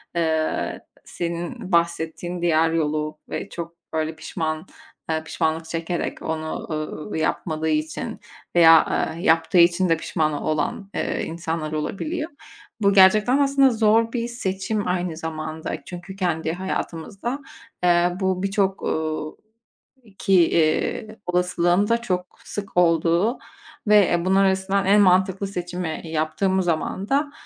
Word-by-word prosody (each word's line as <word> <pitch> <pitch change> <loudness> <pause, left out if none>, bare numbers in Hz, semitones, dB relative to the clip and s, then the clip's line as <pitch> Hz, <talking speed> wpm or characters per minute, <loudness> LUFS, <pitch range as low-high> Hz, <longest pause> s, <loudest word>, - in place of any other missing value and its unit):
eee, 160 -2 0 0.3
senin 175 +5 -5
bahsettiğin 170 +1 0
diğer 165 -1 +3
yolu 155 -1 -1
ve - - -4
çok 170 -1 -6 0.2
öyle 160 0 -1
pişman 155 0 -4 0.6
pişmanlık 160 0 -1
çekerek 165 +1 -3
onu, 160 0 -4
ııı, 155 +4 -4
yapmadığı 160 0 -1
için 155 0 -2 0.4
veya 165 -2 +5
yaptığı 165 -2 +3
için 175 +1 +5
de 165 - +3
pişman 155 -1 -1
olan, 155 +7 -2
eee, - - -1
insanlar 160 -1 -4
olabiliyor. 305 - -3 0.5
Bu 200 -1 +4
gerçekten 210 +6 +6
aslında 275 -1 +4
zor 225 0 +3
bir 235 -1 -1
seçim 205 -3 -2
aynı 180 -2 -1
zamanda. 160 -1 -4
Çünkü 180 +1 -8
kendi 165 -4 -1
hayatımızda, 190 - -4 0.4
eee, 175 0 +4
bu 190 -1 0
birçok, 195 0 0
uuu, 155 -1 -2 0.8
ki, 195 - +1 0.2
iii, 170 +7 0
olasılığın 180 +2 +2
da 230 0 +2
çok 180 -5 -3
sık 200 -3 -7
olduğu 170 +5 +3 0.5
ve 195 -5 +4
bunlar 190 +1 +4
arasından 190 +1 +1
en 205 +2 +5
mantıklı 190 +1 +3
seçimi 180 -3 -4
yaptığımız 165 +4 0
zaman 175 +4 -2
da 285 +1 +1
175 Hz, 120 wpm, -23 LUFS, 160-195 Hz, 0.8 s, gerçekten